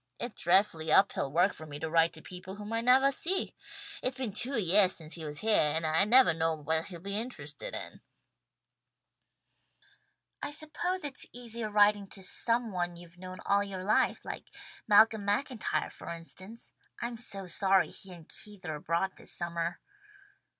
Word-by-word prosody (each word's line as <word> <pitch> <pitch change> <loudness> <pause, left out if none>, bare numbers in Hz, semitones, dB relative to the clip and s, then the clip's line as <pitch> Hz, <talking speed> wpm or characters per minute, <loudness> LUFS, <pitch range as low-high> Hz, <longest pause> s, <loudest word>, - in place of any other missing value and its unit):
It's 240 -1 -5
dreadfully 165 -3 +3
uphill 155 -6 +4
work 175 +6 +3
for 155 - -10
me 145 -1 -7
to 160 - -4
write 165 +1 +3
to 160 - -10
people 185 +1 -8
whom 210 +2 -7
I 230 - +1
nevah 260 +3 +5
see. 370 +8 -2 0.5
It's 255 +1 -2
been 250 -6 -3
two 255 +5 -2
yeahs 190 -1 +5
since 160 -1 -7
he 165 - -6
was 150 -1 -5
heah, 210 -9 +3
and 160 0 0
I 160 +4 +4
nevah 245 -4 +6
know 160 0 0
what 160 +2 -1
he'll 175 -3 -8
be 200 +3 -3
interested 255 - -4
in." - - -7 2.4
"I - - -2
suppose 310 +5 -2
it's 280 -3 -3
easier 235 -2 -5
writing 205 -1 +4
to 195 0 -7
some 230 +4 +1
one 175 -2 -2
you've 175 0 -14
known 185 0 -8
all 200 0 +3
your 190 -2 -6
life, 210 +3 +2
like - - -6 0.4
Malcolm 215 0 +5
MacIntyre 205 - -1
for - - -10
instance. 185 +6 -9 0.3
I'm 235 0 -3
so 200 -4 -1
sorry 190 +1 +2
he 190 - -5
and 170 -3 -12
Keith 205 -4 -6
are 160 - -3
abroad 170 +5 -1
this - - -3
summer." 170 0 -2
195 Hz, 170 wpm, -30 LUFS, 170-225 Hz, 2.4 s, nevah